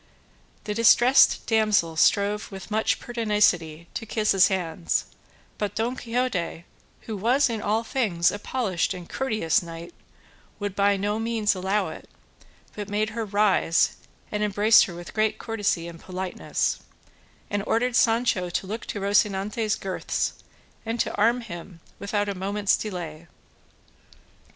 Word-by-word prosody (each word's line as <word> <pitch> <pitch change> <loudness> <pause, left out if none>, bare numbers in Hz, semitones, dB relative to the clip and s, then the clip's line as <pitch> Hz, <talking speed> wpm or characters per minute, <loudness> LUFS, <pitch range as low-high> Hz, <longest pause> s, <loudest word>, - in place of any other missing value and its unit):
The 210 - -3
distressed 240 +4 +5
damsel 215 -7 +2
strove 205 +6 +2
with 195 +2 -9
much 220 +1 +1
pertinacity 200 -9 0
to 225 - -5
kiss 215 0 +1
his 195 -1 +6
hands; 165 - -1 0.5
but 205 -1 -2
Don 235 +3 -1
Quixote, 230 -9 -2 0.4
who 220 - -6
was 245 +6 +2
in 225 -2 -3
all 220 +3 0
things 210 -9 +1
a 205 - -5
polished 205 -8 -1
and 175 -2 -9
courteous 215 - 0
knight, 170 0 -9 0.6
would 205 -2 -4
by 200 0 +3
no 205 +2 -1
means 225 -2 +1
allow 190 +2 -1
it, - - -10 0.6
but 205 -1 -6
made 215 +1 0
her 225 0 -3
rise 200 -5 +2 0.4
and 210 - -2
embraced 210 +1 +5
her 175 - -8
with 175 0 -9
great 215 0 +1
courtesy 205 -7 -1
and 170 -1 -10
politeness, 185 +1 -2 0.7
and 205 -1 -1
ordered 245 +1 +1
Sancho 225 -6 +2
to 175 - -2
look 220 +4 -6
to 205 - -4
Rocinante's 205 +2 +1
girths, 190 -1 -2 0.5
and 230 +1 -3
to - - 0
arm 230 +4 +2
him 175 -4 -9 0.2
without 205 0 -1
a 200 - -1
moment's 200 +2 0
delay. 170 -5 -6
205 Hz, 140 wpm, -25 LUFS, 185-220 Hz, 0.7 s, his